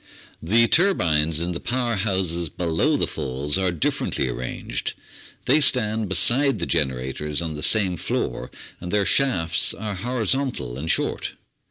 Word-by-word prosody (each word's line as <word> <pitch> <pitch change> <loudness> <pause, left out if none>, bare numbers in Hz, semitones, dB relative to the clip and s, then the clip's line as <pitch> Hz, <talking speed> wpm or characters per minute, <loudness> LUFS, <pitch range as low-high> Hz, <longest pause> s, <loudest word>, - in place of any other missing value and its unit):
The 115 +8 +3
turbines 80 - +2
in 85 +1 -2
the 85 - -4
power 120 -1 -1
houses 95 -5 -1
below 90 - 0
the - - +2
Falls 70 +3 -2
are 95 -2 +1
differ 85 -4 -1
ently 65 - -1
arranged. 60 - -4 0.5
They 145 +4 +4
stand 110 -6 +2
beside 125 - +4
the 85 - -2
generators 65 +2 -2
on 80 -2 -3
the 75 - -7
same 95 -3 +2
floor, 60 - -3 0.3
and 90 0 -6
their 105 -1 +2
shafts 90 -14 +2
are 105 0 -4
horizontal 120 - -2
and 75 +5 -5
short. - - 0
95 Hz, 150 wpm, -23 LUFS, 80-115 Hz, 0.5 s, They